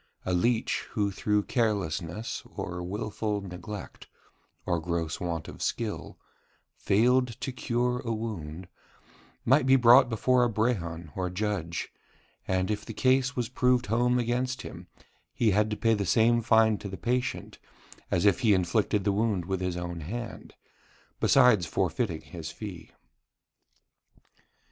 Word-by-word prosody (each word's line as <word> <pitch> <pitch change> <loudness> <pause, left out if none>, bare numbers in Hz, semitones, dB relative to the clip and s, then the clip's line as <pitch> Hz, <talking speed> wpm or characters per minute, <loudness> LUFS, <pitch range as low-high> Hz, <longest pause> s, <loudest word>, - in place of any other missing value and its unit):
A 95 - 0
leech 115 +6 +1
who 100 -2 0
through 105 +1 0
carelessness, 105 -3 -2
or 90 0 -4
wilful 105 +2 -3
neglect, 95 +1 -8 0.6
or 85 - 0
gross 85 -1 -2
want 85 -3 -3
of - - -10
skill, 110 -3 -3 0.6
failed 125 +5 +3
to 135 - -3
cure 125 0 -1
a 120 -3 -4
wound, 95 -7 -5 0.8
might 130 +2 +4
be 135 - +7
brought 125 0 +7
before 125 +2 +2
a 120 - +2
brehon 85 -8 -2
or 90 -1 -2
judge, 90 -3 -3 0.5
and 95 +2 0
if 105 -1 -2
the 115 - -8
case 130 +1 +2
was 120 -3 -1
proved 125 0 +2
home 120 +4 +2
against 125 +2 -1
him, 90 +1 -9 0.5
he 115 -3 +3
had 105 +2 +2
to 105 - -3
pay 115 -1 +2
the 105 -2 0
same 115 +6 +4
fine 110 -1 +4
to 100 - -6
the 95 - -6
patient 125 +1 -2 0.5
as 90 +2 +1
if 100 - +4
he 115 -5 +4
had 95 - +3
inflicted 100 +3 0
the 100 - +2
wound 100 -3 0
with 95 0 -2
his 90 -1 -2
own 85 -1 -4
hand, 115 +8 -7 0.6
besides 125 -10 +5
forfeiting 90 0 -1
his 80 -3 -8
fee. 95 -1 -8
105 Hz, 145 wpm, -28 LUFS, 90-120 Hz, 0.8 s, be